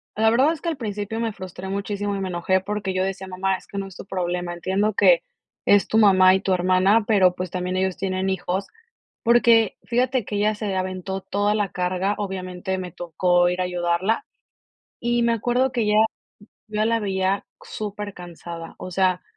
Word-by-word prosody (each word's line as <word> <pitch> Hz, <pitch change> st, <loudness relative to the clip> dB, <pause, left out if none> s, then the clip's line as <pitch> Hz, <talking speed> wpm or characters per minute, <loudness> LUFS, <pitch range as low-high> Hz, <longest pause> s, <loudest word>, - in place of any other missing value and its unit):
la 220 Hz, +1 st, +4 dB
verdad 265 Hz, +7 st, +4 dB
es 315 Hz, -, -9 dB
que 335 Hz, -, -1 dB
al 315 Hz, -, -3 dB
principio 210 Hz, 0 st, -4 dB
me 225 Hz, -2 st, -1 dB
frustré 185 Hz, 0 st, -8 dB
muchísimo 200 Hz, +1 st, -2 dB
y -, -, -3 dB
me 190 Hz, -, -2 dB
enojé 180 Hz, +2 st, +1 dB
porque 205 Hz, -1 st, -3 dB
yo 185 Hz, 0 st, +1 dB
decía: 195 Hz, 0 st, -3 dB
"Mamá, 190 Hz, +1 st, -1 dB
es -, -, -17 dB
que 200 Hz, -, -6 dB
no 195 Hz, -, -4 dB
es 190 Hz, -, -13 dB
tu -, -, -9 dB
problema, 175 Hz, -2 st, -2 dB
entiendo 195 Hz, +4 st, 0 dB
que -, -, +5 dB, 0.4 s
es 205 Hz, -1 st, +4 dB
tu 220 Hz, -, +1 dB
mamá 190 Hz, -3 st, +6 dB
y -, -, +1 dB
tu 190 Hz, -, +1 dB
hermana, 185 Hz, +4 st, +3 dB
pero, 190 Hz, -5 st, +4 dB
pues, 180 Hz, -1 st, -5 dB
también 180 Hz, +1 st, -2 dB
ellos 190 Hz, -1 st, 0 dB
tienen 190 Hz, 0 st, -1 dB
hijos", 190 Hz, +1 st, -2 dB, 0.6 s
porque 230 Hz, -2 st, +4 dB
fíjate 250 Hz, -1 st, +1 dB
que 205 Hz, -, -4 dB
ella 210 Hz, +1 st, +2 dB
se 205 Hz, -2 st, -3 dB
aventó 185 Hz, +1 st, -3 dB
toda 205 Hz, +2 st, 0 dB
la 205 Hz, -2 st, 0 dB
carga, 185 Hz, +3 st, 0 dB
obviamente, 190 Hz, -1 st, -4 dB
me 180 Hz, -1 st, -5 dB
tocó 175 Hz, +2 st, +1 dB
ir 180 Hz, +1 st, -2 dB
a -, -, +1 dB
ayudarla, 180 Hz, -, 0 dB, 0.8 s
y 240 Hz, 0 st, +1 dB
me 235 Hz, 0 st, +3 dB
acuerdo 245 Hz, +3 st, +1 dB
que 240 Hz, -3 st, -1 dB
ella 210 Hz, 0 st, +2 dB, 0.7 s
yo 215 Hz, -, -13 dB
ya 215 Hz, -, +2 dB
la 230 Hz, 0 st, +2 dB
veía 190 Hz, -1 st, -1 dB, 0.2 s
supercansada. 180 Hz, -5 st, -7 dB
O 185 Hz, -, -7 dB
sea, 185 Hz, 0 st, +1 dB
195 Hz, 195 wpm, -23 LUFS, 185-210 Hz, 0.8 s, mamá